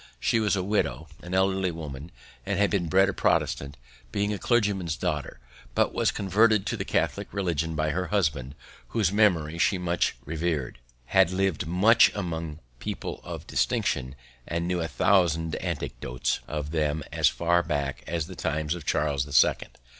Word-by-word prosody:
She 115 - +2
was 105 -2 +2
a 95 - -1
widow, 80 - -1
an 90 +1 -4
elderly 95 0 +2
woman; 75 -2 -7 0.4
had 100 +1 +1
been 95 -5 0
bred 95 +4 +4
a - - -1
Protestant, 70 +1 0 0.3
being 100 +1 0
a 100 - -4
clergyman's 100 -9 +1
daughter, 75 -8 -3 0.4
but - - +2
was - - +2
converted 105 +1 +3
to - - -1
the - - -3
Catholic - - -1
religion 85 -5 -1
by 75 0 0
her 90 +3 -2
husband, 75 -9 0 0.3
whose 105 -6 +1
memory 85 -7 +2
she 95 - +3
much 85 -1 0
revered; 75 -5 -2 0.3
had 95 +6 +4
lived 95 -5 0
much 105 +7 +5
among 80 -5 -4 0.2
people - - -5
of - - -7
distinction, 65 -1 0 0.3
and 85 +1 -2
knew 90 -1 0
a 80 - -1
thousand 80 -4 +2
anecdotes 60 +1 -3
of 75 -1 -4
them 75 -1 0
as - - +3
far 85 +1 +2
back 70 -6 -3
as 85 -2 -2
the - - -10
times 75 +1 -1
of 85 -4 -8
Charles 70 -3 +1
the 75 - -11
Second. 65 - +3
85 Hz, 165 wpm, -27 LUFS, 75-95 Hz, 0.4 s, much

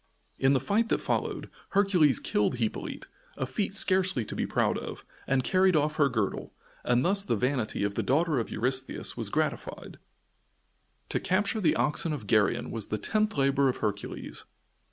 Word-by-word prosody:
In 135 +1 +4
the 135 - +3
fight 210 - 0
that - - +1
followed, - - -2 0.3
Hercules 180 - +4
killed 105 +3 0
Hippolyte 115 -3 -4 0.3
a 130 - -1
feat 195 +9 -3
scarcely 185 - +4
to - - -6
be - - -1
proud - - +1
of - - -8 0.2
and 135 -1 +1
carried 185 +2 +3
off 150 0 +1
her 145 -2 +4
girdle, 110 -6 -3 0.3
and 125 +1 +2
thus 195 +2 +3
the 120 - 0
vanity 125 -2 -1
of 100 0 -1
the - - -1
daughter 155 0 +1
of 115 - -3
Eurystheus 130 +3 -1
was - - -3
gratified. - - -3 1.1
To - - 0
capture 205 +3 0
the 175 - +3
oxen 155 +1 +1
of 120 -8 -6
Geryon 105 +3 +1
was 110 -3 -3
the 105 - -2
tenth 215 - -1
labor 140 0 +3
of 125 - -2
Hercules. 105 -2 -4
135 Hz, 175 wpm, -28 LUFS, 120-185 Hz, 1.1 s, In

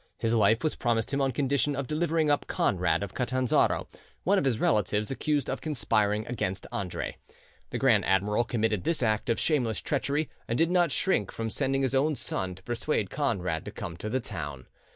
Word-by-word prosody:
His 115 0 0
life 110 +1 +4
was 155 - +1
promised 120 +1 0
him 140 - +1
on 135 -1 +2
condition 140 +2 +1
of 135 0 -2
his - - -16
delivering 155 -1 +1
up 145 - +1
Conrad 90 +1 +1
of 100 - -6
Catanzaro, 130 0 +1 0.4
one 195 +2 +3
of - - -1
his 120 -5 +1
relatives, 105 +2 +1
accused 145 0 0
of 135 - -3
conspiring 110 -8 +1
against 95 -5 -3
Andre. 95 -3 -4 0.5
The - - -3
grand - - +4
admiral 100 +4 +2
committed 110 -5 0
this 165 -6 0
act 110 -1 +1
of 115 - +1
shameless 125 -8 +1
treachery, 145 +1 -1 0.2
and 115 - -1
did 165 +1 +3
not 175 -4 +3
shrink 135 - +1
from 115 -1 -4
sending 135 +4 0
his 130 - 0
own 145 +3 +2
son 95 -7 -3
to 95 - -17
persuade 120 -3 -1
Conrad 95 - -1
to - - -5
come 85 - -6
to 110 - -5
the 130 +4 0
town. 75 - -6
120 Hz, 195 wpm, -28 LUFS, 105-140 Hz, 0.5 s, life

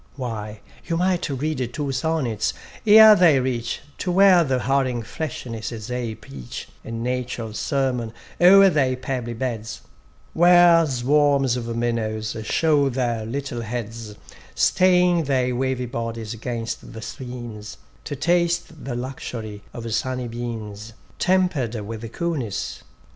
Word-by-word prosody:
Why, 110 -5 -5 0.3
you 165 - 0
might 180 -1 0
read 135 -3 -2
two 145 -2 -2
sonnets, 130 -5 -1 0.3
ere 215 0 +9
they 165 -8 +5
reach 120 -2 -2 0.2
To 180 - -1
where 185 -1 +6
the 135 -4 0
hurrying 130 -2 0
freshnesses 115 -4 -6
aye 120 -3 -3
preach 70 - -9 0.2
A - - -10
natural 120 -1 -3
sermon 130 -3 -1 0.3
o'er 195 +2 +8
their 135 -5 +2
pebbly 125 -2 -4
beds; 115 -3 -4 0.5
Where 175 -1 +6
swarms 135 0 +2
of 115 -1 -4
minnows 110 -2 -2
show 145 +4 +2
their 120 -4 -2
little 130 -1 -4
heads, 115 -1 -6 0.4
Staying 180 - +3
their 130 -2 +1
wavy 130 0 -1
bodies 115 -2 -4
'gainst 115 0 -5
the 110 - -8
streams, 120 -5 -8 0.3
To 145 - -4
taste 170 0 0
the 130 -3 -4
luxury 120 -4 -6
of 115 -1 -6
sunny 130 +1 -2
beams 115 -2 -6 0.3
Temper'd 180 -11 +1
with 110 +2 -7
coolness. 120 - -3
125 Hz, 125 wpm, -23 LUFS, 115-150 Hz, 0.5 s, ere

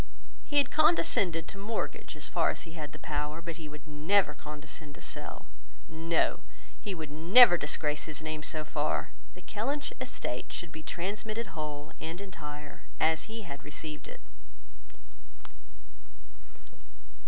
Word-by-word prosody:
He 290 - 0
had 285 - +5
condescended 200 - +4
to 200 - -6
mortgage 215 +3 -3
as - - -1
far - - +3
as - - -2
he 165 - -10
had 155 -3 -5
the - - -8
power, 150 +1 -2
but 170 0 -5
he 155 -3 -7
would 150 -1 -10
never 155 +3 +3
condescend 150 0 -8
to - - -12
sell. - - -6 0.4
No; 165 +1 +2 0.4
he 200 -3 -3
would 155 -3 -5
never 175 +8 +9
disgrace 150 -1 0
his 155 -3 -2
name 155 -1 -3
so 155 +1 -1
far. 150 0 0 0.2
The 180 - -12
Kellynch 275 +8 -2
estate 185 - -3
should 175 -3 -5
be 160 - -7
transmitted 210 +5 -3
whole 150 -1 -4
and 165 +2 -4
entire, 150 -6 -7 0.2
as 160 0 +3
he 225 0 -5
had 140 -6 -7
received 150 +1 -6
it. - - -10
160 Hz, 145 wpm, -31 LUFS, 150-195 Hz, 0.4 s, never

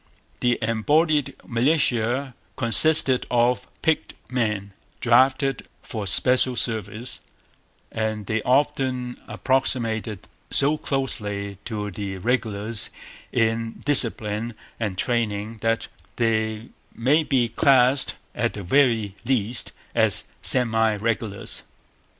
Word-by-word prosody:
The 120 -1 +2
embodied 145 +7 +1
militia 125 0 +1 0.2
consisted 130 +2 +5
of 120 -2 +2 0.2
picked 160 -1 0 0.2
men, 105 -5 -1 0.3
drafted 130 +2 +2 0.2
for 105 -3 -5
special 125 +6 +3
service; 110 0 -4 0.7
and 110 -2 -2
they 110 +2 -1
often 130 -1 0
approximated 115 -6 -1 0.3
so 145 +2 +2
closely 105 -7 -3
to 105 -3 -4
the 95 0 -5
regulars 110 -1 -2 0.4
in 115 0 0
discipline 115 -5 +2 0.2
and 105 -5 -3
training 110 -1 -1
that 115 0 0 0.3
they 110 -1 -1 0.3
may 140 +7 +3
be 130 -5 +1
classed, 130 +2 +3 0.2
at - - -1
the 100 - -6
very 115 -2 +2
least, 120 -2 0 0.2
as - - +3 0.2
semi 115 -3 +3
regulars. 105 -1 -3
115 Hz, 95 wpm, -24 LUFS, 110-130 Hz, 0.7 s, consisted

